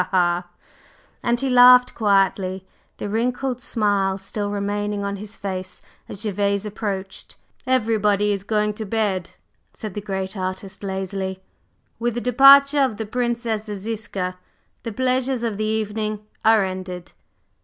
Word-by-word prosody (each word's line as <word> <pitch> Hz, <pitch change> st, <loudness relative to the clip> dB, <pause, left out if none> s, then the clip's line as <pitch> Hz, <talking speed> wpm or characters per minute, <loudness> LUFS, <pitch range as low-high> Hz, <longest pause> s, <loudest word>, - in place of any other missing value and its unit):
ha!" 175 Hz, -1 st, +1 dB, 0.7 s
And 240 Hz, 0 st, +1 dB
he 270 Hz, -, -1 dB
laughed 250 Hz, 0 st, +7 dB
quietly, 195 Hz, -3 st, +1 dB, 0.3 s
the -, -, -4 dB
wrinkled 250 Hz, +4 st, -1 dB
smile 200 Hz, -4 st, +1 dB
still 205 Hz, +1 st, -4 dB
remaining 205 Hz, 0 st, -2 dB
on 200 Hz, 0 st, -3 dB
his 210 Hz, +2 st, -8 dB
face 185 Hz, -2 st, -5 dB, 0.3 s
as 200 Hz, -, -7 dB
Gervase 200 Hz, -1 st, 0 dB
approached. 200 Hz, -2 st, -5 dB, 0.3 s
"Everybody 210 Hz, -5 st, +2 dB
is 200 Hz, -1 st, -1 dB
going 210 Hz, 0 st, 0 dB
to 215 Hz, +1 st, -6 dB
bed," 200 Hz, -4 st, -1 dB, 0.4 s
said 215 Hz, -4 st, -7 dB
the 205 Hz, -, -4 dB
great 190 Hz, -1 st, -4 dB
artist 190 Hz, 0 st, -5 dB
lazily. 190 Hz, -1 st, -4 dB, 0.6 s
"With 240 Hz, 0 st, -1 dB
the 240 Hz, -, -2 dB
departure 275 Hz, +3 st, +7 dB
of 255 Hz, -6 st, +1 dB
the 220 Hz, -, -3 dB
Princess 235 Hz, -1 st, -2 dB
Ziska, 205 Hz, -3 st, -4 dB, 0.4 s
the 230 Hz, -, -5 dB
pleasures 255 Hz, +1 st, 0 dB
of 225 Hz, -4 st, -2 dB
the 215 Hz, -, -1 dB
evening 215 Hz, -1 st, -2 dB, 0.2 s
are 220 Hz, -2 st, +5 dB
ended." 185 Hz, -1 st, -6 dB
210 Hz, 135 wpm, -22 LUFS, 195-230 Hz, 0.7 s, laughed